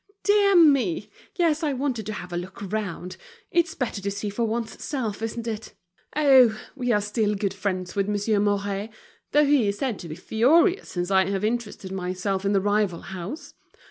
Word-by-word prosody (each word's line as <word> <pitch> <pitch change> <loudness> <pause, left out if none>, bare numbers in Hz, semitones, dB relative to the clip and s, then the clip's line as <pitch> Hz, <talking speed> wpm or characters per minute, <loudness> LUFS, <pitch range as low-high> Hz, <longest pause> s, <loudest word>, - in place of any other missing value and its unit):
"Dear 405 -1 +4
me! 255 - +4 0.2
yes, 330 -4 +2
I 300 -3 0
wanted 255 -5 -2
to 215 - -3
have 180 -3 -7
a - - -2
look 180 +2 -6
round. 185 -4 -4 0.3
It's 345 -1 +1
better 240 -6 -3
to 200 - -2
see 200 +1 -4
for 230 +3 -1
one's 225 0 -3
self, 230 -8 -3
isn't 225 +1 -4
it? 225 -1 -5 0.4
Oh! 260 -7 +6 0.2
we 250 -3 -1
are 210 - +4
still 210 0 0
good 195 -1 -1
friends 185 -2 -3
with 200 0 0
Monsieur 205 +1 +1
Mouret, 205 0 0 0.4
though 295 +1 +5
he 280 -6 +3
is 200 0 -1
said 250 -5 -2
to 170 - -8
be 155 - -5
furious 300 - +3
since 175 +1 -3
I 190 -1 +4
have 195 0 -2
interested 215 -4 -3
myself 190 +1 -2
in 200 - +2
that 195 - +3
rival 205 -3 +1
house. 190 - -7
210 Hz, 190 wpm, -25 LUFS, 195-255 Hz, 0.4 s, Oh